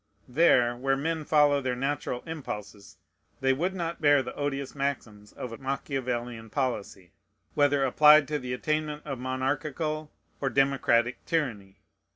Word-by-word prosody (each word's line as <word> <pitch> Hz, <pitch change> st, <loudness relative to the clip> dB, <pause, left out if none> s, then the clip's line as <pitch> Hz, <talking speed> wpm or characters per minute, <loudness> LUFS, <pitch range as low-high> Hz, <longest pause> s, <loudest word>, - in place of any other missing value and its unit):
There, 125 Hz, -4 st, +4 dB
where 135 Hz, +2 st, 0 dB
men 160 Hz, +2 st, -2 dB
follow 145 Hz, -2 st, +4 dB
their 130 Hz, -2 st, -1 dB
natural 135 Hz, -1 st, -2 dB
impulses, 105 Hz, -11 st, -7 dB, 0.4 s
they 135 Hz, 0 st, +3 dB
would 180 Hz, +8 st, -1 dB
not 170 Hz, -2 st, -4 dB
bear 145 Hz, -2 st, +5 dB
the 125 Hz, -, -7 dB
odious 140 Hz, -1 st, -3 dB
maxims 115 Hz, -7 st, -4 dB
of 125 Hz, -, -7 dB
a 115 Hz, -, -8 dB
Machiavelian 125 Hz, -4 st, -3 dB
policy, 105 Hz, -, -3 dB, 0.4 s
whether 145 Hz, -1 st, +3 dB
applied 150 Hz, +2 st, +6 dB
to 150 Hz, -1 st, -1 dB
the 125 Hz, -2 st, -6 dB
attainment 150 Hz, +2 st, -2 dB
of 135 Hz, -4 st, -5 dB
monarchical 145 Hz, +4 st, -2 dB, 0.3 s
or 135 Hz, -, +1 dB
democratic 130 Hz, -3 st, +2 dB
tyranny. 105 Hz, -12 st, -2 dB
135 Hz, 140 wpm, -28 LUFS, 125-150 Hz, 0.4 s, applied